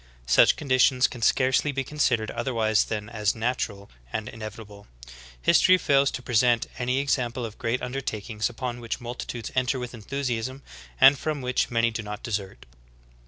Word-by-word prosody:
Such -, -, +5 dB
conditions 130 Hz, -2 st, +3 dB
can 120 Hz, -, -10 dB
scarcely 130 Hz, +4 st, +2 dB
be 135 Hz, -1 st, -2 dB
considered 125 Hz, -6 st, 0 dB
otherwise 115 Hz, -3 st, +1 dB
than 105 Hz, -2 st, -4 dB
as 105 Hz, -3 st, -1 dB
natural 110 Hz, -4 st, -3 dB, 0.2 s
and 110 Hz, -1 st, -3 dB
in 115 Hz, -, -11 dB
evitable. 105 Hz, -2 st, -9 dB, 0.5 s
History 185 Hz, -, +5 dB
fails 140 Hz, -4 st, +3 dB
to 130 Hz, -, -6 dB
present 120 Hz, 0 st, +2 dB
any 125 Hz, +1 st, 0 dB
example 130 Hz, -3 st, -1 dB
of 110 Hz, -2 st, -9 dB
great 125 Hz, -1 st, -1 dB
undertakings 115 Hz, -4 st, -3 dB
upon 120 Hz, 0 st, -5 dB
which 115 Hz, +1 st, -4 dB
multitudes 120 Hz, -1 st, -6 dB
enter 130 Hz, +1 st, +1 dB
with 125 Hz, -1 st, -6 dB
enthusiasm, 130 Hz, +2 st, -4 dB, 0.4 s
and 135 Hz, 0 st, +7 dB
from 155 Hz, -2 st, -2 dB
which 125 Hz, 0 st, 0 dB
many 115 Hz, 0 st, +2 dB
do 110 Hz, -, -4 dB
not 105 Hz, -1 st, -7 dB
desert. 100 Hz, -4 st, -4 dB
120 Hz, 160 wpm, -26 LUFS, 110-130 Hz, 0.5 s, and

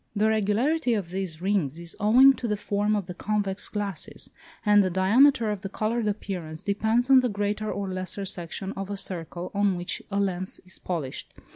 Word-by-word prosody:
The 215 Hz, +1 st, +3 dB
regularity 230 Hz, +6 st, +1 dB
of 185 Hz, -5 st, -3 dB
these 185 Hz, -3 st, -3 dB
rings 185 Hz, -8 st, 0 dB
is 170 Hz, -1 st, -6 dB
owing 250 Hz, +6 st, +7 dB
to 240 Hz, -, -3 dB
the 210 Hz, -1 st, 0 dB
form 205 Hz, +1 st, 0 dB
of 205 Hz, -3 st, -1 dB
the 180 Hz, -, -7 dB
convex 205 Hz, 0 st, -2 dB
glasses, 200 Hz, -6 st, -5 dB, 0.3 s
and 205 Hz, 0 st, +6 dB
the 190 Hz, -, +1 dB
diameter 220 Hz, +6 st, +4 dB
of 205 Hz, -2 st, -4 dB
the 195 Hz, -, -5 dB
coloured 220 Hz, +2 st, -1 dB
appearance 180 Hz, -6 st, -4 dB
depends 220 Hz, +5 st, +1 dB
on 265 Hz, -, +9 dB
the 250 Hz, -1 st, +1 dB
greater 205 Hz, +1 st, -2 dB
or 200 Hz, +1 st, -3 dB
lesser 185 Hz, +1 st, -3 dB
section 190 Hz, +2 st, -4 dB
of 195 Hz, 0 st, -6 dB
a 200 Hz, -, -3 dB
circle 175 Hz, -2 st, -5 dB
on 200 Hz, -2 st, +2 dB
which 175 Hz, 0 st, -4 dB
a 200 Hz, 0 st, -1 dB
lens 185 Hz, -2 st, -1 dB
is 185 Hz, -, -4 dB
polished. 160 Hz, -8 st, -5 dB
200 Hz, 190 wpm, -26 LUFS, 185-215 Hz, 0.3 s, on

